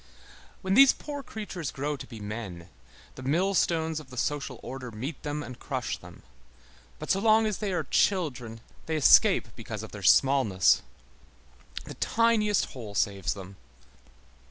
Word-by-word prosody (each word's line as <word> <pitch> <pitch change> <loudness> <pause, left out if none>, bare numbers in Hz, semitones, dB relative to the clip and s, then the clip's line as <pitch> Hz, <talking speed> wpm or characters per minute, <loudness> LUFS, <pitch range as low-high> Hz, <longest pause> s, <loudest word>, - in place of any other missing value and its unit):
When 190 0 0
these 270 +4 +8
poor 290 -1 -7
creatures 205 - -6
grow 145 +2 -3
to 135 - -9
be 115 -3 -10
men, 100 -5 -7 0.4
the - - -10
millstones 160 +1 +1
of 155 - -13
the 125 - -11
social 140 -1 -2
order 130 0 -6
meet 125 +7 -6
them 150 0 -4
and 125 -3 -9
crush - - -3
them, - - -14 0.7
but - - -3
so 195 - +2
long 220 +1 +4
as 215 -3 -2
they 210 -2 -2
are 180 - -1
children, 125 - 0 0.3
they 160 - -1
escape 150 - +5
because - - -7
of - - -9
their - - -8
smallness. 130 -9 +4 1.0
The - - -9
tiniest 220 -3 +2
hole 110 -6 -8
saves 100 -2 0
them. 95 -1 -10
145 Hz, 155 wpm, -28 LUFS, 115-190 Hz, 1.0 s, these